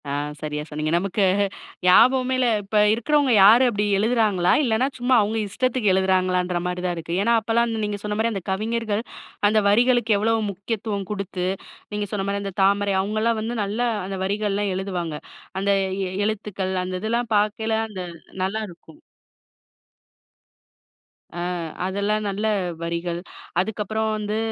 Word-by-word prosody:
ஆ - - -2 0.3
சரியா 150 -1 -3
சொன்னீங்க. 155 0 -3
நமக்கு 195 +3 0 0.6
ஞாபகமே 255 +7 +5
இல்ல. 255 -1 +2 0.2
இப்ப 205 +2 -1 0.2
இருக்கிறவங்க 280 +4 +2
யாரு 225 +6 +8
அப்படி 210 -2 -1
எழுதுறாங்களா? 210 -5 +2
இல்லன்னா 240 +1 +2
சும்மா 250 +1 +3
அவுங்க 210 +2 -1
இஷ்டத்துக்கு 255 -2 +1
எழுதுறாங்களான்ற 185 -1 +1
மாரிதான் 180 0 -2
இருக்கு. 165 +1 -4
ஏன்னா 235 +2 +3
அப்பல்லாம் 230 +2 +1
அந்த 225 -1 -2
நீங்கச் 205 -1 -3
சொன்னா 210 0 -2
மரி 230 +1 +1
அந்தக் 195 -3 -5
கவிஞர்கள், 220 +1 -1 0.5
அந்த 215 +1 +3
வரிகளுக்கு 235 0 +3
எவ்வளவு 225 +2 +1
முக்கியத்துவம் 200 +1 -4
குடுத்து, 195 -3 -3 0.5
நீங்கச் 205 -2 -3
சொன்னமாரி 200 0 -1
அந்தத் 195 -1 -6
தாமரை 200 0 +2
அவுங்கல்லாம் 215 +3 0
வந்து 230 +2 -3
நல்லா 215 +5 -1 0.2
அந்த 195 0 -4
வரிகள் 205 +1 -1
எல்லாம் 200 0 0
எழுதுவாங்க. 180 -4 -3 0.4
அந்த 200 +1 -1 0.4
எ - - -4 0.2
எழுத்துக்கள் 200 -3 -3
அந்த 185 0 -4
இதெல்லாம் 235 +2 -1
பாக்கயில 215 +2 0
அந்த 200 -4 -7 0.4
நல்லாருக்கும். 190 -5 -5 2.3
அ, 175 - -8 0.5
அதெல்லாம் 200 +3 -1
நல்ல 200 +2 -3 0.4
வரிகள். 170 0 -3 0.4
அதுக்கப்புறம் 220 +2 -1
வந்து 210 0 -2
205 Hz, 135 wpm, -23 LUFS, 190-225 Hz, 2.3 s, யாரு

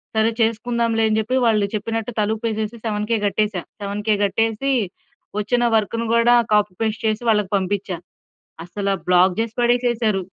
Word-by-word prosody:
సరే 220 +1 +3
చేసుకుందాంలే 230 0 +1
అని 215 0 +1
చెప్పి 225 +4 -1
వాళ్ళు 215 -3 +3
చెప్పినట్టు 225 +2 -3
తలుపేసేసి, 220 +1 -2
7,000 215 +1 0
కట్టేశా. 205 -2 0 0.2
7,000 205 +2 -1
కట్టేసీ, 225 +6 0 0.7
వొచ్చిన 240 +4 0
వర్కును 230 +2 0
గూడా 235 +1 +5 0.2
కాపీ, 210 -1 +3
పేస్ట్ 220 0 -1
చేసి 215 +1 -1
వాళ్ళకి 210 -3 +1
పంపిచ్చా. 190 -1 -2 0.7
అసల 200 +3 -4 0.2
బ్లాక్ 180 +1 +4
జేసి 225 0 -2
పడేసేశారు. 240 -4 +1
220 Hz, 135 wpm, -21 LUFS, 205-230 Hz, 0.7 s, గూడా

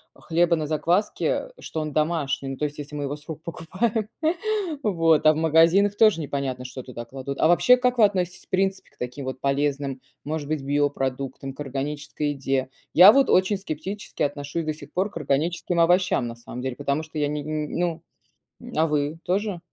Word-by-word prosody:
хлеба 170 +1 +2
на 155 -2 -2
закваске, 175 - 0
что 160 - -4
он 155 -1 -3
домашний, 150 -3 0
ну, 135 - -4
то - - -4
есть 150 0 -5
если 145 0 -7
мы 145 - -3
его 145 +1 -3
с 150 - -18
рук 160 -1 -7
покупаем, 205 +7 -2 0.8
вот, 165 -6 +3
а 155 - +8
в - - -6
магазинах- 165 +6 +4
тоже 215 -7 +5
непонятно, 135 -3 -3
что 130 +1 -7
туда 120 -2 -7
кладут. 135 +3 -6
А 160 - +5
вообще 250 +8 +6
как 250 0 +1
вы 220 - +7
относитесь 180 -3 -2
в - - -44
принципе 190 0 -1
к - - -31
таким 125 +3 -5
вот 130 0 -5
полезным, 140 -1 0 0.2
может 150 -1 -4
быть, 155 -3 -2
биопродуктам, 135 -1 -1
к 135 - -24
органической 145 +2 -3
еде? 135 -2 -1 0.2
Я 185 +5 +10
вот 275 +2 +3
очень 190 +2 +3
скептически 190 +3 -5
отношусь 145 +3 -2
до 155 - -1
сих 150 - -13
пор 190 +4 0
к - - -7
органическим 165 +4 0
овощам, 175 -6 +3
на 115 - -6
самом 120 +1 -8
деле, 130 -1 -4
потому 145 +2 -1
что 155 0 -9
я 145 - +1
не 150 0 -3
н 155 +1 -3
ну 170 -2 -1 0.6
М, - - -10
а 160 +1 +4
вы, 150 +1 -1
тоже? 195 -1 -1
155 Hz, 200 wpm, -24 LUFS, 140-175 Hz, 0.8 s, Я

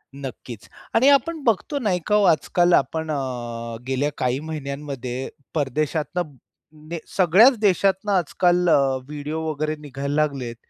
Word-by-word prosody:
नक्कीच 130 -5 -8 0.3
आणि 255 +5 +6
आपण 300 +2 +2
बघतो 240 +6 0
नाही 195 -7 0
का 210 - +3
हो 210 - +4
आजकाल 175 +2 +3
आपण 160 +4 +1
अ, 120 -4 -4
गेल्या 135 +2 0
काही 125 +1 0
महिन्यांमध्ये 140 -4 -5 0.2
परदेशातनं 155 +2 -2 0.5
ने 170 - -3 0.2
सगळ्याच 195 +9 +6
देशातनं 200 0 +2
आजकाल 180 0 +2
अ, - - +6 0.3
व्हिडिओ 150 +2 -5
वगैरे 155 +1 -2
निघायला 140 0 -4
लागलेत, 140 -6 -1
155 Hz, 130 wpm, -23 LUFS, 135-180 Hz, 0.5 s, आणि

